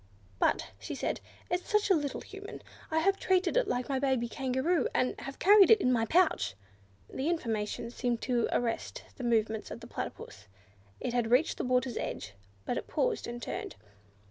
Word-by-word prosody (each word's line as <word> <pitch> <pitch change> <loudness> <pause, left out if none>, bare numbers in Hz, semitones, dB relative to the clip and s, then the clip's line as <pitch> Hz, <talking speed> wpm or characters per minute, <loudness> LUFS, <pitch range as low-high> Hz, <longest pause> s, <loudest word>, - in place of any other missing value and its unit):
"But," - - +1
she 110 - -5
said, - - -2 0.3
"it's 355 0 -1
such 420 -1 +2
a - - +9
little 290 -5 -1
Human! 405 +2 -9 0.3
I 315 - 0
have 390 +3 +2
treated 370 0 +2
it - - +3
like 245 0 -1
my 270 -2 0
baby 260 -3 +1
Kangaroo, 265 +8 0
and 255 - +2
have 275 - -7
carried 400 0 +7
it 445 - +8
in 255 -9 +2
my 225 -2 +1
pouch." 340 - +2 0.5
This 265 +3 -3
information 230 -7 -2
seemed 240 -1 -1
to 240 -3 +1
arrest 235 -2 -2
the 255 - -6
movements 220 -2 +1
of - - -7
the - - -10
Platypus; 95 +2 -7 0.5
it 240 - -3
had 240 -2 +1
reached 255 +6 +3
the - - 0
water's 250 -1 +1
edge, 100 0 -4 0.3
but 245 - -1
it - - -4
paused, - - 0
and 240 0 -6
turned. - - -5
260 Hz, 185 wpm, -31 LUFS, 235-355 Hz, 0.5 s, a